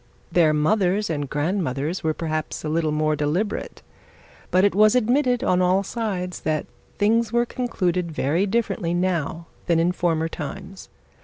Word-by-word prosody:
Their 165 -3 +4
mothers 185 +5 +1
and 145 -3 -3
grandmothers 155 0 -1
were 155 -1 0
perhaps 155 -2 -3
a 155 - -2
little 160 0 0
more 155 0 +1
deliberate; 165 +9 -2 0.7
but, 185 +1 +3
it 205 - +2
was 215 +3 +5
admitted 250 +1 +2
on 180 0 +2
all 185 +2 +3
sides 190 -5 -3
that 155 -1 -1 0.3
things 225 +2 +2
were 240 0 +2
conducted 180 -9 -1
very 160 +6 0
differently 195 -5 -1
now 175 -2 -1 0.2
that 170 - +3
in 170 +2 +2
former 165 -3 0
times. 185 +5 -8
180 Hz, 150 wpm, -23 LUFS, 155-205 Hz, 0.7 s, was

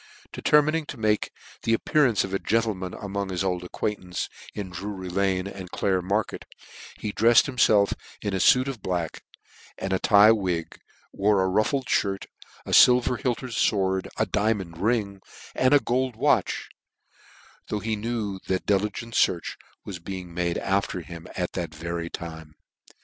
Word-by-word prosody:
Determining 150 +1 +2
to 145 - -7
make 110 -1 +1 0.3
the 115 - +2
appearance 130 -2 +2
of 95 - -6
a 95 - +1
gentleman 105 -5 -1
among 100 -1 -4
his 90 0 -2
old 90 -2 -1
acquaintance 90 -1 -3 0.3
in 100 -3 -5
Drury 95 0 -6
lane 95 0 0
and 95 -2 -8
Clare 95 0 0
mar 100 +4 +1
ket, - - -10 0.5
he 105 - -4
drefied 115 +1 +6
himfelf 110 -7 +3 0.3
in 105 - -3
a 95 - 0
fuit 130 +7 +5
of 130 -6 -5
black 90 -4 -3 0.6
and 95 0 -3
a 95 - +1
tye 105 +1 +7
wig, 90 -7 -1 0.3
wore 100 -1 +2
a - - +1
ruffled 110 +8 +1
fhirt, 100 -5 0 0.4
a - - -6
filver 125 -2 +5
hiked 125 -3 -1
fword, 95 -6 0
a - - +2
diamond 100 -6 -1
ring, 100 -2 0 0.3
and 130 - +2
a - - +7
gold 130 -1 -1
watch; - - +1 1.0
though 105 - -2
he 110 +1 -2
knew 105 -3 -3
that 95 -1 -1
diligent 105 +3 -1
fearch 85 -6 +1 0.3
was 90 -4 -7
making 90 -3 -7 0.2
after 95 -2 -1
him 85 0 -10
at 90 -1 -2
that 85 -3 -4
very 85 +1 -4
time. 80 -3 -8
100 Hz, 155 wpm, -25 LUFS, 90-115 Hz, 1.0 s, tye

